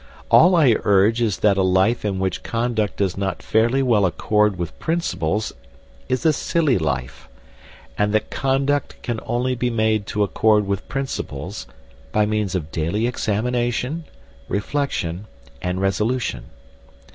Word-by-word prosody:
All 180 +3 +7
I 140 -9 +5
urge 105 +3 +3
is 110 -5 +1
that 100 -2 +4
a - - +3
life 95 +5 +2
in 100 -2 -1
which 95 0 -2
conduct 115 -4 -1
does 95 -2 0
not 95 -3 -3
fairly 115 +5 +2
well 115 -6 +3
accord 105 +3 +1
with 85 -2 -5
principles 110 - -1 0.6
is 130 +2 -1
a 160 - +5
silly 155 -4 +1
life; 65 -5 -3 0.7
and 105 0 +2
that 110 0 0
conduct 135 +1 0
can 120 -3 -2
only 125 +2 0
be 125 0 -1
made 110 -3 +1
to 105 - 0
accord 105 +1 +2
with 100 -1 -3
principles 135 -1 -4 0.4
by 105 0 +2
means 105 -2 -1
of 80 -4 -3
daily 85 +8 -1
examination, 120 +6 -1 0.4
reflection, 105 - -2 0.3
and 90 +1 -2
resolution. 105 +5 -1
110 Hz, 140 wpm, -21 LUFS, 95-125 Hz, 0.7 s, All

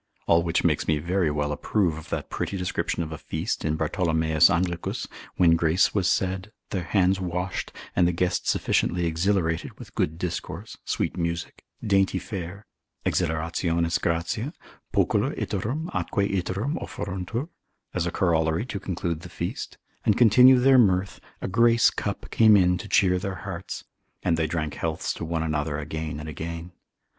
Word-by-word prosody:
All 85 0 +4
which 85 -1 0
makes - - +1
me 80 - +3
very 85 +2 0
well 75 0 -1
approve 85 +2 0
of 80 - -10
that - - -4
pretty 100 - -2
description 90 -1 -1
of 80 - -7
a 80 - -6
feast 80 +5 -3
in 80 0 0
Bartholomeus 80 -3 +3
Anglicus, 85 0 -1 0.3
when 85 -2 +5
grace 85 +2 +3
was 95 -3 +2
said, 95 +2 -1 0.2
their 90 -3 -2
hands 95 +1 +2
washed, 90 +1 -3 0.2
and 90 -1 +4
the - - +2
guests 90 +1 0
sufficiently 90 0 +1
exhilarated, 85 0 0
with - - -12
good 80 +2 -1
discourse, 85 0 -5
sweet - - -1
music, 85 -1 -3 0.2
dainty 95 -2 +3
fare, 95 +1 -6 0.4
exhilarationis 85 0 0
gratia, 85 - -1 0.4
pocula - - +1
iterum 125 - -2
atque 100 -1 0
iterum 100 - -2
offeruntur, 100 - -4 0.4
as 90 -1 0
a - - -1
corollary 80 +2 +1
to 110 -6 -4
conclude 85 -3 -3
the 90 +2 -10
feast, 85 0 -5 0.3
and 105 - +3
continue 125 +3 +7
their 130 +1 +6
mirth, 95 -3 +2 0.2
a - - -1
grace 115 +4 +4
cup 100 -1 -4
came 110 -2 +6
in 90 -1 +4
to - - -7
cheer 90 -2 +4
their 95 0 -3
hearts, 95 -1 -5 0.4
and 85 -2 +2
they 80 -1 0
drank 75 -1 -2
healths 80 -1 -2
to - - -7
one 80 0 -1
another 75 -1 -1
again 80 +1 -4
and 75 - -7
again. 85 +3 -6
90 Hz, 160 wpm, -26 LUFS, 80-95 Hz, 0.4 s, continue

